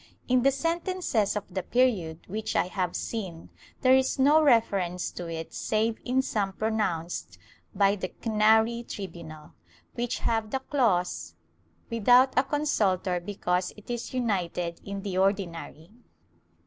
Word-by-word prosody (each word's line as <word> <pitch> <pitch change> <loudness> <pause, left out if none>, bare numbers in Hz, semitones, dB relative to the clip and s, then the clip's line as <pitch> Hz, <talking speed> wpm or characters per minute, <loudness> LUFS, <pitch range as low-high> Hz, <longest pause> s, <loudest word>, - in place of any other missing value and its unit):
In 255 0 +3
the 270 - +5
sentences 330 - 0
of 205 -1 -5
the 190 - -1
period 190 -10 +1
which 215 +3 -4
I - - +3
have 180 -1 -2
seen 185 -8 -5 0.3
there 255 -1 +5
is 265 +1 +3
no 290 +4 +5
reference 200 - +2
to 175 - -6
it 165 -1 -6
save 220 +1 0
in 260 +2 +1
some 200 -6 -1
pronounced 200 -6 -2 0.4
by 200 0 +4
the 185 -2 -4
Canary 220 +2 +2
tribunal, 165 -5 -8 0.4
which 240 0 -2
have 225 -2 -1
the 265 - 0
clause 180 - 0 0.6
"without 245 +4 +5
a 260 - +6
consultor 205 -12 0
because 180 -1 -2
it 210 +3 -9
is 240 -1 -4
united 180 -8 -2
in 200 -1 -6
the 190 -3 -2
Ordinary." 185 -3 -2
210 Hz, 135 wpm, -27 LUFS, 180-245 Hz, 0.6 s, a